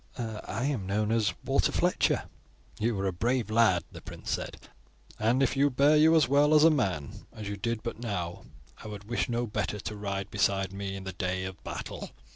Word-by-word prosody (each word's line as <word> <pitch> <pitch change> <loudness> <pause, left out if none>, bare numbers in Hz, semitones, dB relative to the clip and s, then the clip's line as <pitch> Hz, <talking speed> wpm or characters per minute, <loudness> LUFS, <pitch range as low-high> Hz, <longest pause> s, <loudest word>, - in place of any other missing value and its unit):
"I 110 0 -4
am 130 -10 -1
known 105 +2 0
as 115 -2 +1
Walter - - +2
Fletcher." - - +2 0.6
"You 110 -2 0
are 100 - -1
a 95 - 0
brave 120 +5 0
lad," 110 -7 +4
the - - -10
prince - - -7
said, - - -3 0.6
"and 120 +5 +3
if 135 - +1
you 140 +1 +4
bear 140 +4 +4
you 160 +2 +6
as 155 -6 +5
well 145 +3 +4
as 150 - +7
a 165 - +8
man 95 - -2
as 105 -2 -7
you 100 - -3
did 115 +2 -2
but 115 -2 -4
now, 90 -7 -4 0.4
I - - -7
would 105 -1 -7
wish 120 +4 -2
no 120 0 0
better 105 -1 -2
to 105 - -5
ride 100 -1 -4
beside 95 -2 +1
me 100 0 -4
in 95 - -7
the 95 0 -5
day 95 0 -2
of 95 -1 -8
battle. - - -6
110 Hz, 210 wpm, -29 LUFS, 95-120 Hz, 0.6 s, a